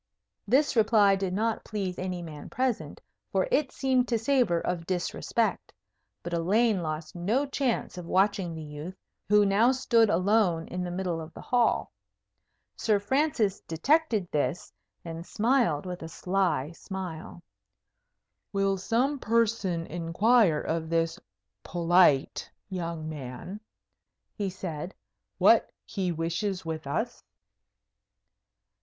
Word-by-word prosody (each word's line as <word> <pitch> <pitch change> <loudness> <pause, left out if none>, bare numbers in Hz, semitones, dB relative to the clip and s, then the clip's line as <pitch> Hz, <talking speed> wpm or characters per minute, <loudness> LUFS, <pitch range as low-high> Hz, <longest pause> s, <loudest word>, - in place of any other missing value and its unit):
This 280 +1 +3
reply 210 -3 +5
did 190 -1 -2
not 220 +4 -1
please 195 -4 -4
any 180 -1 -3
man 155 -3 -9
present, 255 -3 -2 0.3
for - - +1
it 300 - +2
seemed 260 -2 +1
to 235 - +1
savour 230 -7 +2
of 165 -1 -3
disrespect. 180 -2 -1 0.5
But 175 - -5
Elaine 200 +4 +2
lost 155 -1 -4
no 215 +11 +1
chance 270 -9 -2
of 170 - -8
watching 190 -3 +1
the 160 - -6
youth, 150 +5 -7 0.3
who 210 0 +5
now 210 +5 +4
stood 235 -4 +3
alone 185 -2 +2
in 180 0 -3
the 180 - -3
middle 175 -2 -2
of 160 +1 -9
the - - -8
hall. 245 -2 +1 0.8
Sir 215 -2 +2
Francis 230 -3 +1
detected 220 - +1
this, 150 +3 -2 0.3
and 165 0 -6
smiled 220 - +1
with 180 -1 -6
a 160 - -6
sly 175 -5 0
smile. 175 -2 -7 1.1
"Will 195 0 +1
some 255 +8 0
person 215 -7 +1
inquire 175 +2 +2
of 160 0 -2
this 165 0 0 0.4
polite 170 - +3 0.2
young 170 -3 -4
man," 150 +6 -7 0.7
he 200 -3 -2
said, 180 -2 -6 0.4
"what - - +5 0.2
he 190 -4 -2
wishes 170 +4 -2
with 160 -3 -4
us?" 225 - -3
185 Hz, 125 wpm, -28 LUFS, 165-225 Hz, 1.1 s, reply